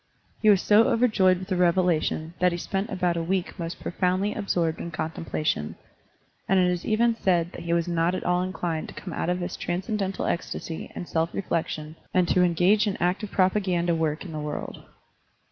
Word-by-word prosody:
He 215 - +5
was 200 -2 +5
so 215 +2 +6
over 245 +2 +3
joyed 185 -5 +3
with 185 +1 -8
the 185 - +1
revelation 175 -2 +1
that 180 0 +4
he 175 - -2
spent 195 +4 -3
about 180 -3 0
a - - 0
week 185 +2 -2
most 165 0 -4
profotmdly 185 +3 0
absorbed 175 -6 0
in 170 - -5
contempla 160 -1 -4
tion, 75 - 0 0.7
and 195 - +4
it 180 -1 +3
is 180 -1 -3
even 230 +2 +2
said 175 -6 +1
that - - -9
he 170 - 0
was 170 0 +1
not 170 +1 +1
at - - -4
all 180 0 +1
inclined 175 -3 -3
to - - -11
come 180 - -7
out - - -2
of 180 - +1
his 175 +1 -3
transcendental 190 +2 -2
ecstasy 170 -1 -4
and 175 - -6
self 165 0 0
reflection 160 -4 -3 0.2
and 180 -1 +4
to 180 - +4
engage 180 +5 +3
in 200 - -1
active 185 +4 0
propa 190 +2 +2
ganda 175 -3 +1
work 160 +1 -1
in 175 - -7
the 155 - -4
world. 150 0 -5
180 Hz, 205 wpm, -26 LUFS, 170-190 Hz, 0.7 s, so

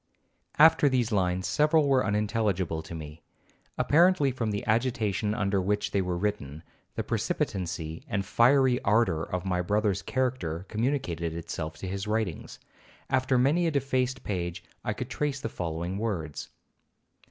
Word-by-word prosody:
'(After 150 -1 +6
these 125 -3 +1
lines 95 -2 +1
several 150 - +3
were 135 -2 +3
unintelligible 105 -5 0
to 80 +1 -9
me, 75 0 -9 0.6
apparently 170 -2 +4
from 120 -3 -2
the 100 -1 -3
agitation 110 -2 0
under 100 -3 +1
which 105 +2 -1
they 100 - +1
were 90 -1 -2
written;—the 85 -6 -5
precipitancy 85 -4 -2
and 100 -1 -2
fiery 125 +3 +4
ardor 100 -6 +2
of 90 +2 -4
my 90 -1 0
brother's 105 +1 0
character 95 -9 -2
communicated 105 - -1
itself 80 -1 -5
to 95 - -6
his 100 +2 -4
writings. 105 -7 -2 0.5
After 130 0 +2
many 150 +8 +3
a - - +3
defaced 130 -3 -1
page 85 -3 -3 0.2
I - - -1
could - - -6
trace 145 -2 -1
the 115 - -4
following 85 +1 -4
words.) 85 -10 -3
105 Hz, 140 wpm, -28 LUFS, 90-130 Hz, 0.6 s, After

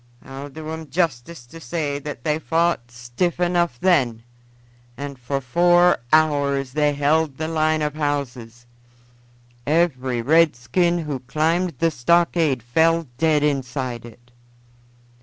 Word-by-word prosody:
I'll 135 +2 -8
do 155 +2 -9
'em 160 -1 -7
justice 150 -3 -2
to 165 +7 -13
say 145 +1 -3
that 145 -4 -8
they 150 0 0
fought 165 -7 0
stiff 120 +9 -3
enough 175 -7 0
then, 125 -11 +1 0.7
and 140 -1 -7
for 135 +3 -3
four 175 +6 +3
hours 140 -4 +2
they 150 +1 +1
held 145 0 +1
the 155 - -3
line 155 -1 +1
of 150 -1 -2
houses; 130 -6 -4 1.0
every 130 -7 0
redskin 165 +3 +2
who 150 -5 -4
climbed 160 +6 -1
the 165 +3 +1
stockade 160 -1 +1
fell 160 +5 +1
dead 155 -2 +2
inside 130 -4 -2
it. 120 +1 -15
150 Hz, 125 wpm, -22 LUFS, 125-165 Hz, 1.0 s, four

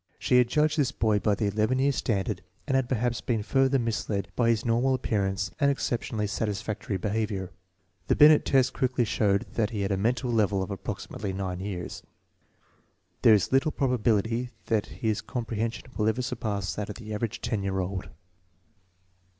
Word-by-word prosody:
She 125 - +3
had 125 - +4
judged 150 +4 +2
this 135 -2 +2
boy 110 -6 +1
by 105 0 +2
the 105 - -1
11 110 +5 +1
year 140 +2 +3
standard 105 -6 -1 0.2
and 135 - -2
had 130 -2 +1
perhaps 120 -1 0
been 115 -4 -1
further 135 +3 +3
misled 105 -4 -2
by 115 -2 +2
his 115 0 +1
normal 120 +3 +2
appearance 100 -6 -1
and 140 -2 +4
exceptionally 120 -5 -1
satisfactory 105 -1 -2
behavior. 100 -1 -2 0.6
The - - +3
Binet 150 0 +7
test 135 -1 +3
quickly 130 -2 +1
showed 100 +1 +1
that 110 -1 0
lie 105 -3 -3
had 100 +1 -1
a 95 - +1
mental 120 +4 0
level 105 -4 +2
of 100 - -6
approximately 100 0 -5
9 95 -2 -3
years. 95 -3 -5 1.2
There 110 - +7
is 100 - 0
little 135 +4 +3
probability 120 -3 +1 0.2
that 110 -2 0
his 110 -2 -2
comprehension 115 -2 -3
will 105 - +1
ever 125 +3 -1
surpass 100 -9 -2
that 105 +3 -4
of 105 - -5
the 110 -2 -7
average 115 +2 -3
10 110 -3 -1
year 95 -1 -2
old. 95 +1 -3
110 Hz, 175 wpm, -27 LUFS, 100-125 Hz, 1.2 s, Binet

